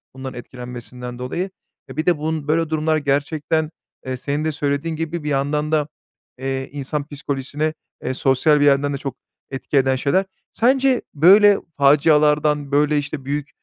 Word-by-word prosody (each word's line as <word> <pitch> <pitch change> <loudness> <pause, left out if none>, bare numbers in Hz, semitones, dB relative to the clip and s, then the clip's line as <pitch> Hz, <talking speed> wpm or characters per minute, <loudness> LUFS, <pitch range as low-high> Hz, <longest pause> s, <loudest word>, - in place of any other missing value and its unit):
bundan 130 0 -6
etkilenmesinden 125 0 -8
dolayı. 175 +10 -3 0.4
E, - - -10
bir 155 - -1
de 175 -3 +3
bun 155 -1 -3
böyle 160 +1 +1
durumlar 155 0 +1
gerçekten, 150 +2 0 0.3
eee, 130 0 -3
senin 145 +4 -2
de 155 - +1
söylediğin 145 +2 -2
gibi 165 0 -4
bir 150 - -2
yandan 150 +2 0
da, 150 -1 +2 0.5
eee, 135 0 -3
insan 145 +1 -4
psikolojisine, 145 +1 -3 0.3
eee, 130 - -1
sosyal 135 +3 +3
bir 145 - +4
yerden 140 0 +3
de 140 - -2
çok 135 -2 -5 0.4
etki 135 +2 -2
eden 135 -1 +3
şeyler. 145 +9 +1 0.3
Sence 260 +1 +2
böyle 200 +6 +6 0.2
facialardan, 150 0 +3
böyle, 150 +1 +3
işte, 145 -1 -4
büyük 145 +1 -3
145 Hz, 160 wpm, -21 LUFS, 135-155 Hz, 0.5 s, böyle